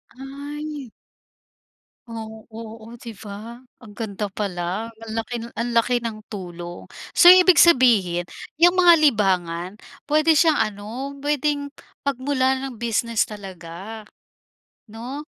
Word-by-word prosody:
Ay. 285 0 -7 1.2
Oo. 220 -1 -9
Oh, 225 +1 -10
'di 235 0 -9
ba, 220 +3 -9 0.2
ang 220 - -12
ganda 205 -2 -4
pala, 195 +1 -3 0.2
ang 225 - -8
laki 225 +2 -3 0.3
ang 240 - -1
laki 235 +2 +3
ng 225 -2 -4
tulong. 175 -3 -8 0.3
So, 350 - +8
ibig 365 -1 +8
sabihin 220 - +5 0.3
yang 345 +3 +5
mga 350 -1 +8
libangan 185 - +1 0.3
puwede 310 +2 +3
siyang 320 0 +4
ano, 205 -2 -6 0.4
puwedeng 290 0 -1 0.4
pagmulan 265 0 0
ng 270 -2 -5
business 230 -1 0
talaga, 195 +1 -9 0.8
'no? 240 +7 -7
230 Hz, 115 wpm, -22 LUFS, 205-280 Hz, 1.2 s, So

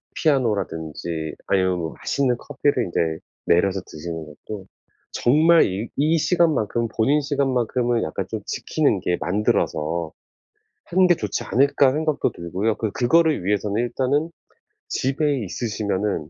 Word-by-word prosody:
피아노라든지 85 - -1
아니면 95 -2 +2
뭐 80 -1 -4
맛있는 130 -3 0
커피를 140 -2 0
인제 80 -2 -1 0.3
내려서 95 +3 +3
드시는 80 0 -7
것도 95 +6 -9 0.5
'정말 160 +6 +5
이 100 +5 -3
이 155 +4 +2
시간 170 0 +3
만큼은 115 -1 -1
본인 140 +7 +3
시간만큼은 125 -4 0
약간 80 - -3
좀 - - -4
지키는 - - 0
게 90 - 0
만들어서 85 -4 0 0.7
하는 185 +1 +3
게 175 - +6
좋지 105 - -3
않을까?' 140 +1 +3
생각도 155 -1 0
들고요. 95 +6 -2
그 110 -3 -3
그거를 155 - +2
위해서는 105 +2 0
일단은 140 +6 0 0.6
집에 140 +1 0
있으시면은 100 -5 -2
115 Hz, 315 characters per minute, -23 LUFS, 90-140 Hz, 0.7 s, 게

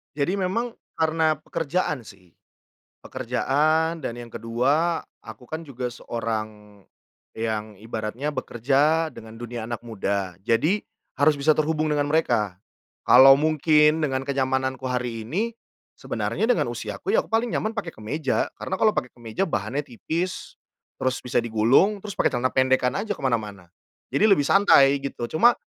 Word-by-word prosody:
Jadi 160 +7 0
memang 195 +6 -1 0.2
karena 160 0 +2
pekerjaan 155 -6 -2
sih, 90 -5 -17 0.6
pekerjaan 150 +6 0
dan - - -2
yang 120 0 -9
ke-2 140 +10 0 0.2
aku 115 +2 -12
kan 160 +1 -5
juga 125 -3 -4
seorang 110 -3 -5 0.5
yang 110 -1 -3
ibaratnya 115 +5 -4
bekerja 145 +5 +1
dengan 110 -5 -12
dunia 120 0 -6
anak 120 0 -5
muda, 100 -5 -3
jadi 155 - +2 0.4
harus 150 +2 +5
bisa 150 +2 +3
terhubung 155 0 0
dengan 145 -1 +1
mereka. 115 - 0 0.4
Kalau 135 +2 +8
mungkin 150 +1 +3
dengan 135 -3 0
kenyamananku 130 -1 -1
hari 125 -3 -3
ini, 205 - -2 0.4
sebenarnya - - -2
dengan - - +1
usiaku 400 - -4
ya - - +2
aku - - -22
paling 230 +1 +2
nyaman 220 +1 -2
pakai 210 -6 -4
kemeja 135 +3 -2
karena 190 - -3
kalau 215 +2 +3
pakai 125 - -2
kemeja 115 - -6
bahannya 110 +7 -2
tipis, 160 +8 -4 0.5
terus 130 0 0
bisa 125 -1 -1
digulung, 120 - +3
terus 205 0 -7
pakai - - +2
celana 130 0 -1
pendekkan 130 -1 +2
aja 205 0 -3
ke - - -12
mana-mana, 105 -7 -2 0.4
jadi 215 +1 +4
lebih 145 -8 +4
santai 140 -7 +5
gitu, 140 -3 -4
cuma 235 +10 +5
135 Hz, 145 wpm, -24 LUFS, 115-160 Hz, 0.6 s, Kalau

